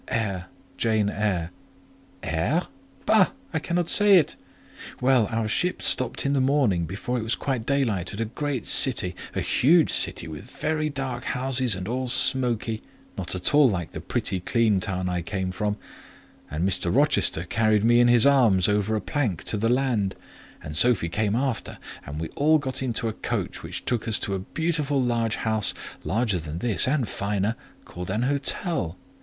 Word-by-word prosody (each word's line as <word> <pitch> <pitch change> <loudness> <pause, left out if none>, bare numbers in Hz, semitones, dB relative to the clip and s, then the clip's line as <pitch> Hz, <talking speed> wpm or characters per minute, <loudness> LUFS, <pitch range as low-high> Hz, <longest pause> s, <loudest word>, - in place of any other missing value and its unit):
"Eyre—Jane 105 +1 -2
Eyre." 95 -6 -2 0.7
"Aire? 85 - 0 0.4
Bah! 210 -4 +5 0.3
I 160 - 0
cannot 170 +2 -1
say 205 0 +5
it. 160 - +1 0.6
Well, 125 -4 +3
our 115 -1 -1
ship 180 +12 0
stopped 130 +1 +1
in 140 - +1
the 135 - +2
morning, 130 - +1
before 120 +7 -3
it - - -4
was 115 +1 -1
quite 130 -5 -3
daylight, 115 -11 0
at 105 - -8
a 115 - 0
great 130 +1 -4
city—a 95 -9 +1
huge 160 +5 +3
city, 85 - +2
with 80 +9 -9
very 155 +1 -2
dark 135 -4 -5
houses 130 -3 +1
and 95 0 -6
all 130 +2 -2
smoky; 120 -3 +1 0.3
not - - -4
at 90 +8 +2
all 145 -3 +6
like 90 -5 -3
the - - -7
pretty 95 - -1
clean 110 +2 +1
town 95 -2 -3
I 90 -1 -1
came 95 +1 -3
from; 105 +2 -2 0.7
and 80 +5 -1
Mr. 95 - +1
Rochester 80 - +2
carried 110 +2 +1
me 120 +1 +4
in 120 - +5
his 120 0 +6
arms 115 -10 +4
over 105 +1 +1
a 105 - -1
plank 120 - -2
to 105 - -2
the 115 +2 0
land, 120 -7 0 0.5
and 75 -1 -7
Sophie 100 -2 +3
came 105 +4 0
after, 130 -1 -2 0.3
and 75 +2 -6
we 80 - -4
all 155 +2 +3
got 135 -4 -3
into 120 -3 -1
a 110 - -2
coach, - - -4
which - - -6
took 120 -1 -1
us 110 - +5
to 100 - -2
a 95 - -2
beautiful 150 - -1
large 115 -3 0
house, 110 -2 0 0.3
larger 110 -3 0
than 75 0 -6
this 110 +3 +2
and 130 -3 +1
finer, 100 +3 -2 0.3
called 90 +1 -8
an 105 +5 -1
hotel. 140 - -1
115 Hz, 175 wpm, -25 LUFS, 95-135 Hz, 0.7 s, all